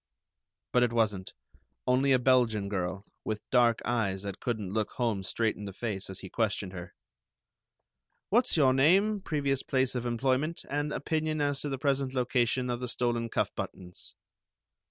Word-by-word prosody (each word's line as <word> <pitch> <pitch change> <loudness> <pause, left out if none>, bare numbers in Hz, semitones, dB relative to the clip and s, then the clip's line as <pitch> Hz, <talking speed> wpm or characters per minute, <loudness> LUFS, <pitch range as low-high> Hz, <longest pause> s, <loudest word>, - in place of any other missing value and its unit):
But 125 - +5
it 120 -1 +3
wasn't; 105 -5 0 0.5
only 130 +2 +3
a 130 - +6
Belgian 120 -5 +3
girl, 95 0 -3 0.2
with 110 -1 -4
dark 120 -2 +4
eyes 105 -5 0
that 100 -1 -5
couldn't 110 -6 -3
look 110 -1 0
Holmes 110 -6 -1
straight 110 +4 0
in 105 - -8
the 100 - -6
face 100 -2 -4
as 95 - -7
he 95 - -7
questioned 100 -4 -1
her. 90 -1 -8 1.4
"What's 235 -3 +3
your 135 -4 +5
name, 190 +10 +4
previous 140 -6 0
place 130 -1 +1
of 125 -1 -2
employment, 130 +7 0
and 145 +1 -1
opinion 155 +1 -1
as 145 -1 0
to 145 - -2
the 135 - -2
present 135 -1 0
location 125 0 +1
of 120 - -2
the 125 - -3
stolen 120 -1 -1
cuff - - 0
buttons?" 90 -1 -6
120 Hz, 165 wpm, -30 LUFS, 105-135 Hz, 1.4 s, a